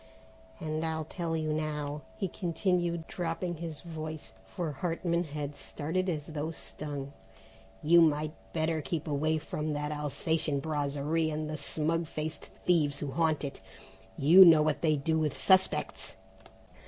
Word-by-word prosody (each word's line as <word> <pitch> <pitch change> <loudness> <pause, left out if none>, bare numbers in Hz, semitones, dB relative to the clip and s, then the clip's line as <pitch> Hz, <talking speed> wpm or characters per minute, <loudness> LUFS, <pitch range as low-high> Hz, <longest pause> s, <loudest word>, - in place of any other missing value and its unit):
And 155 0 -2
I'll 160 -1 -2
tell 165 0 -2
you 155 -1 -1
now," 150 -1 -2 0.2
he 195 - -1
continued 175 -2 0
dropping 175 0 -3
his 165 -2 -5
voice, 155 - -7
for 165 - -3
Hartman 170 +3 -1
had 145 -1 -4
started 170 +7 -2
as 150 -4 -2
though 155 -1 -3
stung, 145 -3 -6 0.7
"you 170 +2 +7
might 155 -1 +3 0.2
better 160 -1 0
keep 150 +3 -3
away 155 +2 +1
from 155 0 -3
that 150 0 -2
Alsatian 150 0 -1
Brasserie 150 +2 0
and 155 0 -3
the 155 - -3
smug 160 +3 -1
faced 155 -1 -5 0.2
thieves 150 -5 +3
who 145 -2 -4
haunt 160 0 +1
it. 140 - -5 0.6
You 170 +7 +9
know 160 -4 +8
what 150 -1 0
they 155 -2 +3
do 160 +3 0
with 150 -3 -1
suspects!" 190 -1 +2
155 Hz, 145 wpm, -30 LUFS, 150-165 Hz, 0.7 s, You